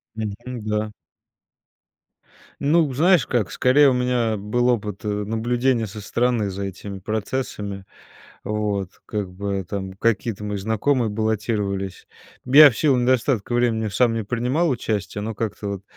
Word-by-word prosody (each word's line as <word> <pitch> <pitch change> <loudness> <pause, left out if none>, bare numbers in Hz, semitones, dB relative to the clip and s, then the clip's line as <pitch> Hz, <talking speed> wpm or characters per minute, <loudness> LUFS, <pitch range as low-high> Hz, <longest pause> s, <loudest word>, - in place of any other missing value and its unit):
Мгм. 110 -2 -3 0.3
Да. 105 0 -1 1.7
Ну 150 0 +3
знаешь, 160 - +3
как? 120 -6 0
Скорее, 135 +2 +5
у - - +2
меня 125 -3 +1
был 105 +5 0
опыт, 105 -4 -2
э, - - -1
наблюдения 115 +4 0
со 105 +1 -8
стороны 115 -1 0
за 100 +1 -5
этими 100 +1 -7
процессами. 105 -1 -4 0.6
Вот. 105 -3 -2 0.2
Как 100 -4 -4
бы 100 0 -3
там 95 +1 -5
какие-то 110 0 -1
мои 105 -1 -3
знакомые 110 +4 +1
баллотировались. 105 -3 -2 0.4
Я 145 +3 +9
в 115 - -7
силу 140 -5 +3
недостатка 125 -2 +1
времени 115 -3 +1
сам 115 +3 +2
не 115 -2 -2
принимал 125 +9 0
участия, 105 -4 -2
но 110 +1 -3
как-то 105 -1 -4
вот 100 -1 -5
110 Hz, 140 wpm, -22 LUFS, 100-125 Hz, 1.7 s, Я